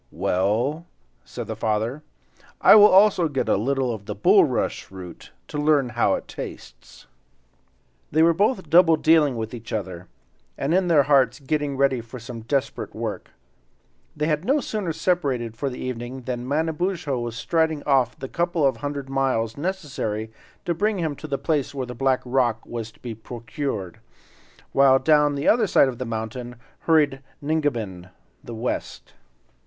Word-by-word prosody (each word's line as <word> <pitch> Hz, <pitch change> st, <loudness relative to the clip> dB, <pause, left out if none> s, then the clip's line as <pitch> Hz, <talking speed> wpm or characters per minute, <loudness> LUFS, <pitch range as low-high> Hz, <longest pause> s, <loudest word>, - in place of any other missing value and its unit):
"Well," 120 Hz, -, -1 dB, 0.4 s
said -, -, -7 dB
the -, -, -5 dB
father, 110 Hz, +6 st, -1 dB, 0.6 s
"I -, -, +7 dB
will 210 Hz, -1 st, +9 dB
also 190 Hz, -3 st, +5 dB
get 140 Hz, -4 st, -2 dB
a -, -, +3 dB
little 130 Hz, +3 st, 0 dB
of 105 Hz, -2 st, -9 dB
the 105 Hz, -, -4 dB
bulrush 105 Hz, -, +2 dB
root, 90 Hz, -2 st, -11 dB, 0.2 s
to 150 Hz, -, -5 dB
learn 145 Hz, -4 st, +2 dB
how 120 Hz, 0 st, +2 dB
it -, -, -7 dB
tastes." -, -, -10 dB, 1.1 s
They 160 Hz, +2 st, +4 dB
were 170 Hz, 0 st, +5 dB
both 195 Hz, 0 st, 0 dB
double 165 Hz, +1 st, +6 dB
dealing 155 Hz, -4 st, +3 dB
with 110 Hz, +1 st, -4 dB
each 115 Hz, -1 st, -9 dB
other, 95 Hz, -4 st, -5 dB, 0.5 s
and 140 Hz, +4 st, -1 dB
in 185 Hz, 0 st, +2 dB
their 155 Hz, -5 st, +5 dB
hearts 135 Hz, -2 st, +3 dB
getting 145 Hz, -1 st, -2 dB
ready 135 Hz, -3 st, +2 dB
for 115 Hz, +3 st, -10 dB
some 115 Hz, 0 st, -8 dB
desperate 130 Hz, +4 st, -2 dB
work. -, -, -5 dB, 0.9 s
They 150 Hz, -, 0 dB
had 150 Hz, 0 st, 0 dB
no 275 Hz, +8 st, +2 dB
sooner 210 Hz, -, -3 dB
separated 140 Hz, -10 st, -1 dB
for 140 Hz, +4 st, -2 dB
the 125 Hz, -, -8 dB
evening 125 Hz, +1 st, -5 dB
than 125 Hz, 0 st, -5 dB
Manabozho 160 Hz, -1 st, -1 dB
was 120 Hz, -1 st, -4 dB
striding 160 Hz, +3 st, 0 dB
off 130 Hz, -4 st, +2 dB
the 135 Hz, -, -6 dB
couple 170 Hz, 0 st, 0 dB
of 135 Hz, -, +2 dB
hundred 145 Hz, -1 st, -5 dB
miles 130 Hz, -5 st, 0 dB
necessary 140 Hz, -, -3 dB, 0.3 s
to 170 Hz, -, 0 dB
bring 210 Hz, +4 st, 0 dB
him 160 Hz, -5 st, -2 dB
to 155 Hz, -, -8 dB
the 140 Hz, -2 st, -2 dB
place 145 Hz, 0 st, -1 dB
where 130 Hz, -2 st, -2 dB
the 125 Hz, -, -7 dB
black 130 Hz, +1 st, +1 dB
rock 120 Hz, -3 st, 0 dB
was 115 Hz, -2 st, -6 dB
to -, -, -25 dB
be 120 Hz, -2 st, -5 dB
procured, 115 Hz, -, -5 dB, 0.7 s
while 135 Hz, -1 st, +5 dB
down 150 Hz, +1 st, +3 dB
the 140 Hz, -, -2 dB
other 225 Hz, -1 st, +4 dB
side 140 Hz, -, +5 dB
of 120 Hz, -, -7 dB
the 130 Hz, -, -3 dB
mountain 115 Hz, +2 st, -5 dB, 0.2 s
hurried 145 Hz, -5 st, +2 dB, 0.2 s
Ningabinn, 120 Hz, -, -2 dB, 0.3 s
the 120 Hz, -, -8 dB
West. 120 Hz, +3 st, -4 dB
135 Hz, 165 wpm, -23 LUFS, 115-155 Hz, 1.1 s, will